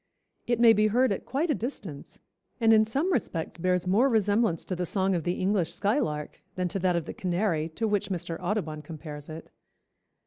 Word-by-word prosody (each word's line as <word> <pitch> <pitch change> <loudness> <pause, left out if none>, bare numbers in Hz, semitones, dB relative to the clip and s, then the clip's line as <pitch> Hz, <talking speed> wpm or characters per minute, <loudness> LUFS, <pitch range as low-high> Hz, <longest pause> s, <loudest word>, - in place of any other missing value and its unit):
It 240 -1 +1
may 230 -1 +8
be 215 0 +3
heard 245 +3 +3
at 195 - -3
quite 300 +6 0
a - - +3
distance, 210 - -6 0.4
and 225 -1 +5
in 220 0 +6
some 280 - 0
respects 165 - -2
bears 180 0 +1
more 225 +9 +4
resemblance 210 -5 +1
to 185 - -3
the 180 0 -2
song 190 +1 +1
of 170 -4 -1
the 175 - +1
English 185 -3 0
skylark 155 - -1
than 180 -1 -1
to 195 - -3
that 180 -1 +2
of 170 -3 -1
the - - -6
canary, 175 -3 -1
to 225 - 0
which 205 -1 0
Mr. 170 -3 -3
Audubon 175 -5 -2
compares 150 -1 -9
it." 160 +1 -9
190 Hz, 200 wpm, -27 LUFS, 170-220 Hz, 0.4 s, may